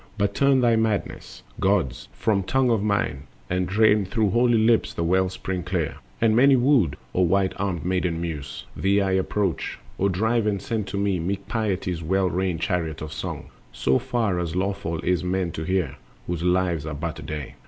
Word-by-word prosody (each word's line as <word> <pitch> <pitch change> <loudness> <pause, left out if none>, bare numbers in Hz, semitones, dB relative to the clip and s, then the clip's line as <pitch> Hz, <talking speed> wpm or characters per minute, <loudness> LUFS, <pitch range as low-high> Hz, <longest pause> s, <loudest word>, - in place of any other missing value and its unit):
But 100 -1 +1
turn 140 +1 +3
their 120 -2 +4
madness, 110 -2 -2 0.2
Gods! 90 -11 0
from 100 - 0
tongue 130 +5 +1
of 110 -3 +2
mine, 90 -9 -1 0.2
And 90 0 0
drain 105 +1 +4
through 100 +2 0
holy 120 +2 +3
lips 110 +1 +2
the 85 - -1
well 95 +2 +2
spring 95 0 -4
clear! 85 -2 -2 0.2
And 110 -1 +3
many 135 +3 +6
wooed, 120 - +3 0.2
O 90 - +2
white 95 +2 +2
armed 95 -5 -2
Maiden 90 -2 0
Muse, 80 -5 -5
Thee 100 +1 +2
I 95 -1 +1
approach: 95 -1 -1 0.2
O 100 - +2
drive 110 +4 +1
and 100 -2 0
send 110 -2 -3
to 100 - -4
me 100 -2 +1
Meek 100 +4 -3
Piety's 95 -6 -1
well 95 +2 +1
reined 90 -2 -1
chariot 80 -5 -1
of 75 0 -6
song, - - -6 0.2
So 65 +2 +1
far 110 -7 0
as 85 -1 -3
lawful 95 -3 -2
is 90 -1 +1
for 90 - -4
men 90 -1 0
to 80 - -5
hear, 85 -6 -1 0.3
Whose 85 -2 -3
lives 90 -3 +1
are 75 - -4
but 80 +2 -4
a - - -7
day. 75 -4 -6
95 Hz, 195 wpm, -24 LUFS, 85-105 Hz, 0.3 s, many